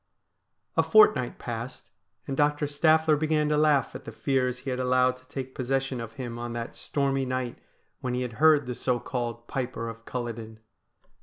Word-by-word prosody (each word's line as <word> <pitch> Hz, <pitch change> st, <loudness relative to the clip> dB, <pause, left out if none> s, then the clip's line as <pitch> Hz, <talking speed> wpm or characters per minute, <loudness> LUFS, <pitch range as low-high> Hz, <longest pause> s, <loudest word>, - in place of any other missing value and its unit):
A -, -, +5 dB
fortnight 425 Hz, -1 st, +5 dB
passed, -, -, -6 dB, 0.3 s
and 135 Hz, -, -3 dB
Doctor 150 Hz, +1 st, +2 dB
Staffler 155 Hz, +2 st, +4 dB
began 150 Hz, 0 st, +1 dB
to 150 Hz, -, +2 dB
laugh 150 Hz, -4 st, +3 dB
at -, -, -8 dB
the 115 Hz, -, -8 dB
fears 125 Hz, +1 st, 0 dB
he 130 Hz, +1 st, -5 dB
had 125 Hz, -, -2 dB
allowed 125 Hz, 0 st, +3 dB
to 130 Hz, 0 st, -23 dB
take 130 Hz, -1 st, -6 dB
possession 135 Hz, -1 st, -1 dB
of 115 Hz, -1 st, -7 dB
him 120 Hz, -3 st, -6 dB
on 120 Hz, 0 st, -4 dB
that 115 Hz, -1 st, -5 dB
stormy 135 Hz, -1 st, 0 dB
night 130 Hz, -2 st, -3 dB, 0.4 s
when 125 Hz, -1 st, -2 dB
he 125 Hz, -, -1 dB
had 125 Hz, -2 st, -5 dB
heard 155 Hz, -3 st, +6 dB
the 125 Hz, -, -3 dB
so 125 Hz, 0 st, 0 dB
called 120 Hz, -2 st, -4 dB
Piper 125 Hz, -3 st, -3 dB
of 115 Hz, 0 st, -10 dB
Culloden. 115 Hz, -3 st, -5 dB
130 Hz, 180 wpm, -27 LUFS, 120-145 Hz, 0.4 s, heard